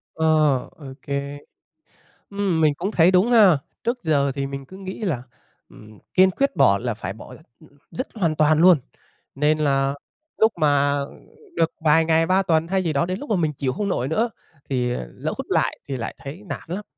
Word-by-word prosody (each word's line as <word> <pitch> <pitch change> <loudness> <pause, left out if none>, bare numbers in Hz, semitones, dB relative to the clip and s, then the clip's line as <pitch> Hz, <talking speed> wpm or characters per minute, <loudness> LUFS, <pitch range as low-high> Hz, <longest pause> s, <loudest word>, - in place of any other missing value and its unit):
Ờ, 160 - -1 0.5
ô 145 - -12 0.2
kê. 140 0 -4 0.9
Ừm, 200 -5 0
mình 150 -2 +3
cũng 195 - -3
thấy 175 -2 +4
đúng 190 +6 +3
ha, 205 - +6 0.3
trước 245 +2 -2
giờ 140 -4 +1
thì 140 -1 -2
mình 140 0 -6
cứ 190 - -12
nghĩ 190 -1 -7
là, 165 - -2 0.5
ừm, 105 0 -16 0.2
kiên 190 0 +6
quyết 275 0 -1
bỏ 100 -9 +4
là 120 -2 -3
phải 95 -3 -5
bỏ 110 - -12
l - - -12 0.5
dứt 255 - -5
hoàn 170 -8 0
toàn 155 0 +3
luôn, 180 -3 +7 0.6
nên 150 +2 +1
là, 140 -2 +1 0.4
lúc 220 0 +4
mà 145 -1 +2 0.6
được 165 0 +2
vài 160 +2 +5
ngày 160 0 +2
ba 185 +2 +3
tuần 165 -2 +1
hay 190 +1 +1
gì 160 - 0
đó 145 +4 +1
đến 185 +1 -3
lúc 290 - -9
mà 210 - +2
mình 155 -4 0
chịu 135 -2 -2
hông 200 +8 -3
nổi 130 -7 -1
nữa 225 +10 0 0.4
thì 125 -2 0 0.2
lỡ - - -4
hút - - -5
lại - - 0
thì 135 - -3
lại 115 -2 -5
thấy 145 +8 -8
nản - - -5
lắm. 190 +5 -5
160 Hz, 200 wpm, -22 LUFS, 140-190 Hz, 0.9 s, luôn